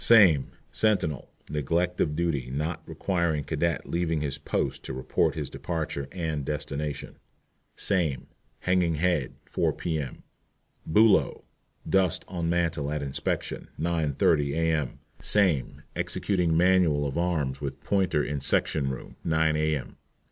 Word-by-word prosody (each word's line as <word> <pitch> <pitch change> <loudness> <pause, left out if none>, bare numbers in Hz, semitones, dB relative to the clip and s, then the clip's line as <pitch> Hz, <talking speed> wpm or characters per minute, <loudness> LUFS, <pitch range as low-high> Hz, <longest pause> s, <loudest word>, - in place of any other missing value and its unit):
SAME. 95 - +7 0.2
Sentinel, 90 - +1 0.2
neglect 85 +5 0
of 75 -2 +1
duty, 75 -7 -1
not 75 +6 -2
requiring 85 -6 0
cadet 80 +3 -1
leaving 85 -2 0
his 70 -3 -2
post - - -2
to - - -4
report 65 0 0
his - - -3
departure 80 -5 -3
and 80 -5 -2
destination. 75 0 -4 0.6
SAME. 85 -10 0 0.4
Hanging 90 -3 +2
head, 80 -4 0
4 - - 0
P.M. 75 -6 -3 0.6
BULOW. 105 +5 +4 0.4
Dust 95 -3 +2
on 85 -2 -2
mantel 85 -4 0
at 75 -1 -2
inspection, 70 -1 -3
9.30 75 -3 +2
A.M. 80 -4 0 0.2
SAME. 95 -10 +2
Executing 90 -5 +1
manual 90 -5 +4
of 70 - -3
arms 80 -6 0
with 70 -1 -4
pointer 95 -7 +2
in 70 0 -2
section 70 0 +1
room, 65 -2 -7
9 80 -1 +2
A.M. 75 -2 -1
80 Hz, 125 wpm, -27 LUFS, 75-85 Hz, 0.6 s, SAME